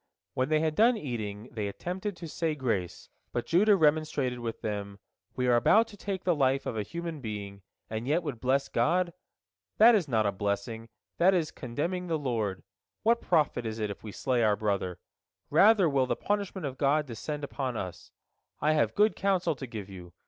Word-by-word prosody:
When 130 +2 0
they 155 0 +3
had 160 -1 +1
done 230 +7 +4
eating, 110 - -5
they 105 -2 -3
attempted 180 - -4
to 170 - -7
say 160 0 -1
grace, 110 - -2 0.2
but 120 - -2
Judah 205 +5 +4
remonstrated 150 -6 +1
with 115 -1 -5
them: 100 -2 -4 0.4
"We 125 - 0
are 125 -1 +4
about 220 - +5
to 210 - -12
take 195 -2 -4
the 180 - +3
life 135 -2 +1
of - - -3
a 110 - -1
human 170 +5 -5
being, 100 -3 -6 0.3
and 110 +2 -4
yet 160 +5 +2
would 140 -7 -4
bless 135 +3 +1
God? 175 +1 +1 0.6
That 230 +3 +8
is 195 -8 +2
not 110 -5 +1
a 100 - +2
blessing, 105 +3 -3 0.3
that 185 +3 +5
is 160 -4 0
contemning 165 +9 -3
the 165 -2 0
Lord. 115 -9 -2 0.4
What 235 +1 +3
profit 150 -7 +1
is 110 -1 -4
it 105 -2 -2
if - - -10
we 110 - -7
slay 125 +2 0
our 105 -2 +4
brother? 100 -4 -1 0.5
Rather 205 -3 +6
will 135 -3 +2
the - - 0
punishment 200 -3 -2
of 135 -2 -5
God 145 +2 +2
descend 145 +4 -5
upon 130 -4 -3
us. 90 -4 -6 0.5
I 155 +2 +2
have 155 - +1
good 210 +1 +4
counsel 185 -4 +1
to 130 0 -7
give 110 -4 -7
you. 90 -3 -11
135 Hz, 195 wpm, -29 LUFS, 110-170 Hz, 0.6 s, That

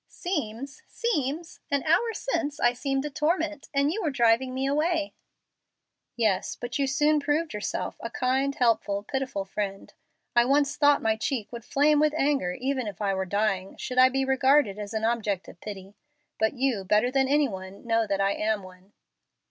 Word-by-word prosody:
"'Seems, 275 - -4
seems!' 325 - -2
An 280 -1 0
hour 455 +9 +2
since 330 -12 -2
I 240 0 +3
seemed 270 +2 -2
a 300 - -4
torment, 305 0 -1
and 280 +1 +2
you 435 - -3
were 325 - 0
driving 240 -1 +2
me 260 +1 -2
away." 305 +2 0 1.0
"Yes, 215 -5 0
but 240 +3 -5
you 275 - +2
soon 295 +2 +3
proved 300 +1 -1
yourself 210 0 -3
a 230 - -5
kind, 265 +3 0
helpful, 215 -4 +1
pitiful 260 -5 -3
friend. 195 0 -5 0.4
I 240 - +6
once 280 +2 +2
thought 290 -1 +4
my 220 0 +2
cheek 225 -1 -3
would 235 -1 -7
flame 295 +4 +3
with 305 0 +2
anger 275 - +1
even 260 +1 -2
if 200 -3 -7
I 200 -2 0
were 190 0 -1
dying, 195 -1 -1
should 255 0 -2
I 255 0 +8
be 270 +1 0
regarded 265 -5 +3
as 205 +1 -6
an 220 0 0
object 215 -6 -1
of 175 - -14
pity. 195 -2 -8 0.5
But 220 0 +2
you, 255 -6 0
better 210 +6 +2
than 265 0 +2
any 290 +1 +3
one, 190 -1 -9
know 225 -1 +1
that 195 -1 -1
I 195 0 +2
am 210 -1 -1
one." 185 +2 -15
255 Hz, 185 wpm, -27 LUFS, 210-290 Hz, 1.0 s, I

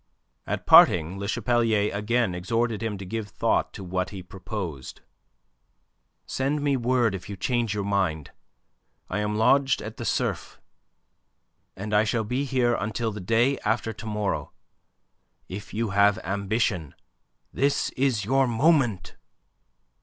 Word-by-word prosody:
At - - -3
parting 90 +3 +6
Le 100 - -4
Chapelier 115 -2 +1
again 110 0 0
exhorted 115 +4 -1
him 110 -3 -3
to 95 - -8
give 105 +2 -4
thought - - 0
to 100 - -8
what 90 0 -2
he 95 -3 -8
proposed. 90 -5 -7 1.2
"Send 145 +3 -1
me 140 -1 +2
word 120 -3 +1
if 95 +1 -7
you 100 - -6
change 115 +2 -1
your 100 - -2
mind. 90 -9 -1 0.8
I - - -1
am 105 0 -1
lodged 135 +5 +3
at - - -8
the - - -5
Cerf, - - -2 1.2
and 105 +2 -5
I 105 +1 +5
shall 110 +1 0
be 125 +6 -2
here 125 -3 +1
until 110 +1 -2
the 105 -1 -7
day 115 +8 +2
after 110 +1 -1
to 110 - -10
morrow. 105 -1 -2 0.9
If 100 +2 -8
you 110 -1 -2
have 100 +1 +4
ambition, 100 - -1 0.6
this 140 +1 +1
is 125 -6 0
your 135 +3 +3
moment." 120 - +1
105 Hz, 140 wpm, -25 LUFS, 100-120 Hz, 1.2 s, parting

